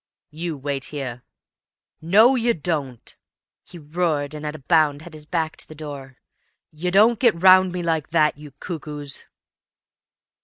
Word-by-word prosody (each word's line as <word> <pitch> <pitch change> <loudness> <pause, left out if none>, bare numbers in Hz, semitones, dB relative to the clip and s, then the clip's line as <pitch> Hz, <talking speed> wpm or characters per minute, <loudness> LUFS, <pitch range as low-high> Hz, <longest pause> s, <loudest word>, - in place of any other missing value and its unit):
"You 160 0 -5
wait 140 -1 -4
here." 130 -5 -6 0.8
"No, 210 +10 +5
you 240 -2 +1
don't," 145 -7 -4 0.5
he 175 - -13
roared, 155 -2 -2
and 150 0 -6
at 150 - -5
a 140 -3 -13
bound 155 -3 +2
had 175 - -12
his 150 -1 -10
back 160 -2 -2
to - - -9
the 155 - -12
door. 140 -4 -9 0.5
"You 165 +4 -3
don't 215 +4 +4
get 235 -9 +3
round 185 0 +6
me 180 -1 -4
like 160 -3 -1
that, 155 -2 +2
you 150 +1 -12
cuckoos!" 150 -5 -6
155 Hz, 155 wpm, -22 LUFS, 145-175 Hz, 0.8 s, round